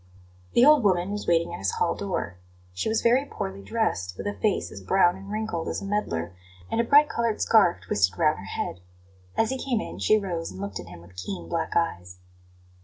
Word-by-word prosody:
The 245 - +6
old 300 -4 +6
woman 185 -1 +2
was 210 0 -4
waiting 170 0 +2
at - - -6
his 95 -1 -1
hall - - +1
door. 90 0 -4 0.3
She 90 - -2
was 220 - 0
very 245 +3 +4
poorly 195 -7 -6
dressed, 95 - -2
with - - -6
a 205 - -1
face 210 -1 -1
as 100 - -9
brown 175 - +3
and 195 +1 -11
wrinkled 215 -6 -3
as - - -2
a - - -7
medlar, 90 - -2 0.4
and 230 - +2
a - - 0
bright 290 +5 +6
coloured 230 -5 -1
scarf 205 - +4
twisted 95 0 +1
round 155 -7 +2
her 100 - -9
head. 95 - -4 0.6
As 225 - +2
he 265 - -3
came 250 -5 0
in - - -6
she 215 - +4
rose 175 -5 -3
and 95 - -10
looked 100 0 -5
at 90 - -9
him 85 -1 -11
with 90 +2 -17
keen 90 -1 -6
black 165 - -2
eyes. 90 - -1
175 Hz, 220 wpm, -26 LUFS, -, 0.6 s, The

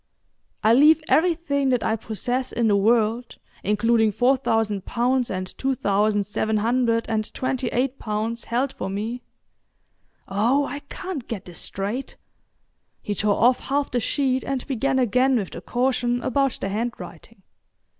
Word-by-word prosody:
—"I 220 - +5
leave 300 +5 +6
everything 315 -5 +2
that 250 -3 +1
I 220 - +1
possess 245 +4 -3
in 235 -1 +1
the 205 - +4
world, 225 +3 +1 0.3
including 220 +2 +2
four 250 +6 +3
thousand 225 -6 0
pounds, 245 +2 0
and 185 -1 -5
two 270 0 0
thousand 205 -1 +1
seven 215 +1 -1
hundred 230 +1 +1
and 215 -1 -2
twenty 255 -1 -1
eight 255 +3 -1
pounds 220 +2 -3
held 255 +3 -1
for 190 - -5
me"—oh, 225 +2 -4
I 285 - -5
can't 365 -10 -6
get 215 -5 -5
this 175 -2 -6
straight." 205 +7 -4 0.9
He 205 - -2
tore 205 0 0
off 245 +1 +3
half 280 +1 0
the 245 - +1
sheet 260 +1 0
and 270 -2 -3
began 270 0 0
again 255 +2 +3
with 200 -5 -3
the - - -8
caution 245 -1 0
about 275 +1 0
the 195 - -3
handwriting. 230 -1 -6
235 Hz, 150 wpm, -23 LUFS, 215-260 Hz, 0.9 s, leave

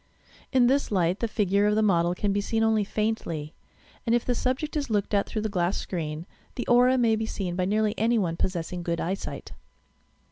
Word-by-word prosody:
In 255 -2 +4
this 275 +1 +2
light 180 -1 +1
the 230 - 0
figure 205 -1 +1
of 210 - +2
the 220 - +2
model 175 -3 +2
can 200 +1 0
be 205 - +1
seen 225 +2 0
only 220 -1 +3
faintly, 195 -8 -2 0.5
and 235 0 +2
if 240 - 0
the 250 - +1
subject 260 +6 -2
is 285 -3 -2
looked 210 -1 -1
at 200 -1 +2
through 215 - -3
the - - 0
glass 180 -2 0
screen, 160 -2 -4 0.3
the 245 - -3
aura 250 +2 +5
may 230 -3 +3
be 220 0 -2
seen 180 -5 -3
by 180 0 0
nearly 210 +2 +1
any 230 +2 +2
one, 175 -6 0
possessing 175 0 -3
good 170 -1 -2
eyesight. 190 +4 -4
210 Hz, 210 wpm, -26 LUFS, 180-230 Hz, 0.5 s, aura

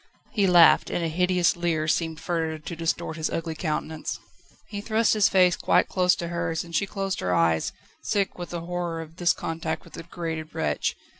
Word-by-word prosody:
He 205 -6 +2
laughed, 175 -2 +6
and 170 - -1
a - - +1
hideous 180 +2 +2
leer 165 -3 0
seemed 160 0 0
further 160 -2 -2
to 155 +3 -7
distort 165 0 -2
his 160 - -1
ugly 165 -1 -3
countenance. 155 -1 -3 0.5
He 205 -1 -5
thrust 220 +1 +2
his 210 -2 +4
face 180 -2 +4
quite - - +2
close 180 -1 +3
to 170 - -5
hers, 170 -1 -2
and 170 -1 -8
she 200 - +1
closed 195 -1 -3
her 90 -1 0
eyes, 80 -1 +2 0.3
sick 200 -2 0
with 175 -1 -7
the 170 -1 -4
horror 175 -1 -3
of 165 +1 -11
this 175 -2 +3
contact 160 -1 -3
with - - -17
the - - -7
degraded 165 -2 -6
wretch. 75 -2 -1
170 Hz, 200 wpm, -26 LUFS, 160-180 Hz, 0.5 s, laughed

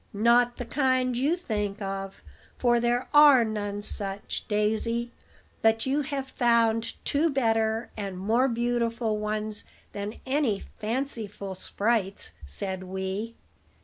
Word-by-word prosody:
"Not 235 +3 +4
the 245 - -4
kind 255 -1 +1
you 280 +7 +2
think 210 - -3
of, 195 -1 -5 0.3
for 240 -1 +3
there 240 +1 +1
are 290 -5 +8
none 205 -1 -3
such, 200 -1 -4
Daisy; 220 +3 0 0.5
but 225 0 +3
you 275 +3 +1
have 275 -1 -4
found 230 -1 +2
two 305 +4 +2
better 225 -4 +1
and 195 -3 -5
more 225 +7 +2
beautiful 235 -2 0
ones 215 0 -2 0.3
than 205 +1 -4
any 260 -7 0 0.2
fanciful 215 -4 -2
sprites," 200 +1 -1 0.2
said 190 - -4
Wee. 190 +4 -4
225 Hz, 120 wpm, -27 LUFS, 205-245 Hz, 0.5 s, are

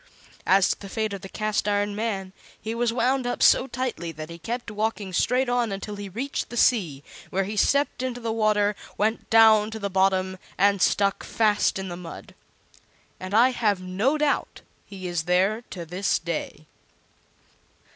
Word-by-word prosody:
As 190 0 +5
to - - -1
the 200 - -9
fate 215 0 -2
of 195 - -6
the 195 - -9
Cast 215 0 -1
iron 205 0 0
Man, 200 -4 -3 0.3
he 220 - -4
was 235 0 0
wound 250 +2 +1
up 245 - -1
so - - +5
tightly 245 -10 -4
that 155 +1 -8
he 170 - -9
kept 235 +6 -5
walking 210 -2 -2
straight 250 +8 +2
on 245 -3 0
until 200 +1 -5
he 200 -1 -7
reached 250 +9 -4
the 240 - -6
sea, 170 - +2 0.3
where 195 +1 0
he 205 +3 -5
stepped 280 +6 +2
into 255 -1 -3
the 230 -1 -3
water, 210 -2 +2 0.2
went 220 +2 -1
down 220 -1 +6
to 220 - -6
the 200 -2 -4
bottom, 190 0 +1 0.2
and 200 -1 +3
stuck 200 +2 +2
fast 210 -3 +1
in 190 0 -4
the 175 - -5
mud. 175 -2 -10 0.9
And 185 +2 -4
I 240 +3 +6
have 215 -6 0
no 195 +11 0
doubt 300 -1 -1 0.3
he 190 -2 -9
is 175 -2 -2
there 190 +5 +2
to 175 -3 -7
this 180 +4 0
day. 165 -2 -5
205 Hz, 180 wpm, -25 LUFS, 190-230 Hz, 0.9 s, down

